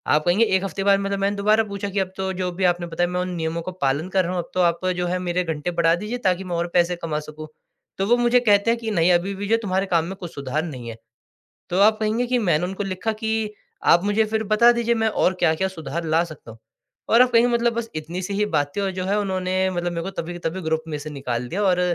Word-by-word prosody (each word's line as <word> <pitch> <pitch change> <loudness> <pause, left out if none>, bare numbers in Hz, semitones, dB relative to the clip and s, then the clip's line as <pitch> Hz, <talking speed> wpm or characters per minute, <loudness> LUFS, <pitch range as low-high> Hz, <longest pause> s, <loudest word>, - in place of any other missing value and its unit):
आप 155 - +1
कहेंगे 185 +6 +4
एक 190 -3 +1
हफ़्ते 195 0 -3
बाद 200 -1 +5
मतलब 195 0 -2
मैंने 200 +1 0
दोबारा 215 +2 +3
पूछा 200 -1 -5
कि, 200 +1 -1
"अब 190 -1 -1
तो 190 0 -2
जो 180 -1 -2
भी 190 +2 -3
आपने 175 -1 +1
बताया 175 +1 -1
मैं 180 0 -2
उन 180 - -3
नियमों 165 0 -2
का 185 - -5
पालन 140 +6 0
कर 190 0 +2
रहा 180 - -2
हूँ। - - -1
अब - - -19
तो 185 - +1
आप 170 +1 +1
जो 180 0 -1
है 180 +1 -1
मेरे 180 0 -1
घंटे 160 0 -3
बढ़ा 165 0 +4
दीजिए 210 +7 -4
ताकि 185 +1 -1
मैं 175 -1 -3
और 170 +1 -1
पैसे 175 0 +3
कमा 155 -2 -1
सकूँ।" 155 0 -9 0.5
तो 195 - +1
वो 240 - +5
मुझे 240 +1 +4
कहते 210 -2 +3
हैं 235 - -1
कि, 225 -1 -3
"नहीं, 175 -3 +3
अभी 175 +3 +1
भी 200 +1 -5
जो 225 +2 +3
तुम्हारे 190 -1 0
काम 170 -3 +2
में 190 +3 -6
कुछ 175 -3 -9
सुधार 140 +3 -2
नहीं 130 -8 -7
है।" 115 - -7 0.7
तो 180 - 0
आप 215 +1 +5
कहेंगे 220 +3 0
कि 250 +1 +1
मैंने 175 -6 +1
उनको 190 +3 -4
लिखा 195 +3 -2
कि, 220 -1 -2 0.3
"आप 170 - +5
मुझे 205 +2 +2
फिर 220 0 -1
बता 235 +3 +6
दीजिए, 235 0 +1
मैं 225 -1 +1
और 190 -3 +1
क्या-क्या 160 +4 +2
सुधार 170 -2 -5
ला 160 +1 +2
सकता 155 -8 -11
हूँ।" 115 - -15 0.5
और 230 - +6
आप 250 0 +4
कहेंगे 235 +1 +4
मतलब 235 0 +2
बस 230 0 -3
इतनी 160 +4 -4
सी 195 +2 -4
ही 210 +1 +1
बात 145 0 0
थी, 205 - -1
और 195 -1 -1
जो 185 0 -4
है 200 +2 +1
उन्होंने 185 -1 0
मतलब 175 -1 -2
मेरे 170 -1 -3
को 195 - -5
तभी 170 +2 -7
के 175 - -8
तभी 185 +3 -6
ग्रुप 160 -1 -1
में 155 -2 -3
से 150 +1 -7
निकाल 125 -4 -4
दिया 205 +8 -1
और 185 -2 +3
185 Hz, 280 wpm, -23 LUFS, 170-205 Hz, 0.7 s, बता